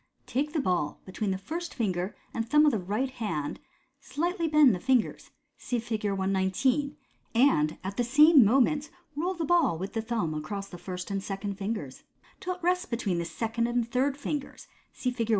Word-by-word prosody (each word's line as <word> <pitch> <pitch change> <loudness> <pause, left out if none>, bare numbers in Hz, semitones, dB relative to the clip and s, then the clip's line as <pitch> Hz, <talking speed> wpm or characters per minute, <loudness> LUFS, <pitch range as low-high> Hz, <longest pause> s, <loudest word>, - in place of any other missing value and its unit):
Take 290 +4 -1
the 320 - +1
ball 180 - 0
be 185 - -10
tween 205 +2 -2
the 190 - 0
first 335 - -5
finger 185 -4 -1 0.2
and 225 0 -3
thumb 300 +3 +6
of 295 - +5
the 220 - 0
right 210 +9 -2
hand 170 - -3 0.4
5 - - -17
slightly 340 +1 0
bend 300 -6 +6
the 180 - -2
fingers 255 +3 +1 0.3
(see 245 - -2
Fig. 225 -2 -3
119), 195 +9 +1 0.4
and 230 - +3
at 190 +1 -5
the 245 - +2
same 295 +3 +7
moment 275 +7 +3 0.3
roll 355 +5 -1
the 335 -2 -2
ball 315 - +3
with 190 +4 -5
the 225 - -1
thumb 220 -8 -1
across 195 +6 -4
the 175 - -9
first 180 +1 -6
and 195 0 -1
second 195 0 -4
fingers, 195 - -4 0.4
till 365 0 -3
it 360 - -19
rests 360 +2 +1
between 210 -7 -1
the 170 - -2
second 230 +5 -1
and 240 -1 -1
third 270 +3 +1
fingers 290 -1 -5 0.2
(see 250 - -2
Fig. 230 -2 -3
230 Hz, 195 wpm, -28 LUFS, 195-285 Hz, 0.4 s, same